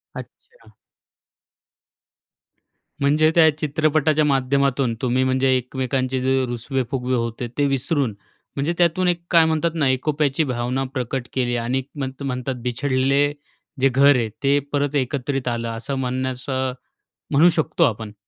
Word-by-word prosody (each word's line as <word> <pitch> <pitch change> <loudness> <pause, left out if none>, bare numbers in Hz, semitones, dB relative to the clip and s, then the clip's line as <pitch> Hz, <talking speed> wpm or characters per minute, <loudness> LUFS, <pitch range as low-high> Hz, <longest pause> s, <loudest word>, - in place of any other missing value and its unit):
अच्छा. 480 +2 -13 2.3
म्हणजे 150 +2 +3
त्या 160 -2 +7
चित्रपटाच्या 155 0 +1
माध्यमातून 135 -2 +1
तुम्ही 125 0 +1
म्हणजे 130 0 +1
एकमेकांचे 130 +1 -2
जे 130 0 +1
रुसवे 125 +2 -2
फुगवे 130 -1 -1
होते. 115 0 -3
ते 145 - +2
विसरून 135 -1 0 0.4
म्हणजे 145 +5 -1
त्यातून 175 +1 +2
1 175 -1 +1
काय 165 -2 +6
म्हणतात 160 +1 +1
ना, 155 -4 +2
एकोप्याची 145 +3 0
भावना 125 -1 -2
प्रकट 125 -1 -3
केली 120 -2 0
आणि 120 +3 -1
म्हण 135 -2 -3 0.2
म्हणतात 125 0 -3
बिछडलेले 135 +3 +1 0.5
जे 135 - +5
घर 140 +2 +5
आहे 115 -3 0
ते 140 +1 +3
परत 145 0 0
एकत्रित 135 0 -1
आलं 115 -1 -2
असं 115 +4 -4
म्हणण्याचं 130 0 -2 0.6
म्हणू 155 +5 +6
शकतो 160 +1 +1
आपण. 110 -5 -2
135 Hz, 130 wpm, -22 LUFS, 125-145 Hz, 2.3 s, त्या